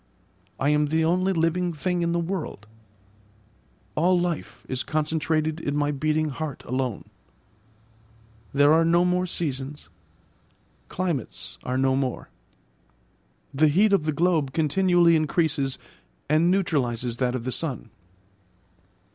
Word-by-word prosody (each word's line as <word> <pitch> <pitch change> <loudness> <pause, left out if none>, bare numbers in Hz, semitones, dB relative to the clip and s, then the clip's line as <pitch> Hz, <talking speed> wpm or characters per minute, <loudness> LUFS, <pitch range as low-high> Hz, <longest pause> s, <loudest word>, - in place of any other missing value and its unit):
I 135 - +2
am 150 0 +2
the 160 +2 +1
only 185 +3 +2
living 175 +1 +1
thing 175 +3 -1
in 170 0 0
the 170 - +1
world: 170 - -4 1.3
all 175 +3 +3
life 175 -3 -4
is 130 -1 -2
concentrated 155 0 -1
in 145 -3 -3
my 145 0 +1
beating 155 +2 0
heart 150 0 -5
alone. 125 -3 -2 1.5
There 145 +2 +5
are 165 +1 +5
no 170 +2 +3
more 180 0 +1
seasons; 145 - -4 1.0
climates 135 - -4
are 125 +1 -2
no 130 0 +2
more; 130 -2 -2 1.2
the 155 +3 +4
heat 200 +8 +3
of 190 -6 +2
the 155 - +1
globe 155 -3 +1
continually 170 +2 +3
increases 155 -3 0 0.5
and 155 +3 +3
neutralises 125 -11 0
that 125 -1 0
of 125 - -4
the 130 - -3
sun. 130 -7 -3
155 Hz, 125 wpm, -25 LUFS, 135-170 Hz, 1.5 s, There